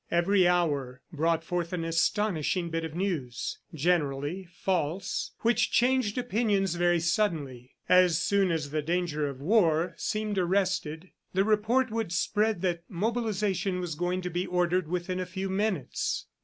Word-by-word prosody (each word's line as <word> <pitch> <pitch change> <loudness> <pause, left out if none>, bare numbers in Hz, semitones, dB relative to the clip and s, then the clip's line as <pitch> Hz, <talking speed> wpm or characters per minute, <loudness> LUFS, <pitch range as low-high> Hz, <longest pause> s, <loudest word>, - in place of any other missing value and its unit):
Every 180 +2 +3
hour 145 -8 0
brought 165 +1 +1
forth 175 +1 -3
an 170 -2 -2
astonishing 170 0 0
bit 165 0 -2
of 160 -1 -5
news 165 -10 -3
generally 160 +1 0
false 180 +1 -2
which 235 -1 +2
changed 250 -3 +2
opinions 205 -6 +1
very 175 0 +2
suddenly. 160 - -1
As 180 -3 +5
soon 195 +2 +2
as 155 -4 -2
the 155 0 0
danger 155 -2 -1
of 135 -1 -9
war 170 -2 +3
seemed 215 -2 -1
arrested, 185 -2 -1 0.2
the 190 - +4
report 220 +4 +2
would 225 -5 -2
spread 210 +2 +1
that 175 -2 0
mobilization 200 -3 -1
was 175 -3 -3
going 180 +4 -1
to 180 - -3
be 175 +2 -2
ordered 180 -1 +1
within 180 +2 -2
a 185 - -2
few 190 +1 -4
minutes. 190 -5 -1
180 Hz, 145 wpm, -28 LUFS, 165-200 Hz, 0.2 s, As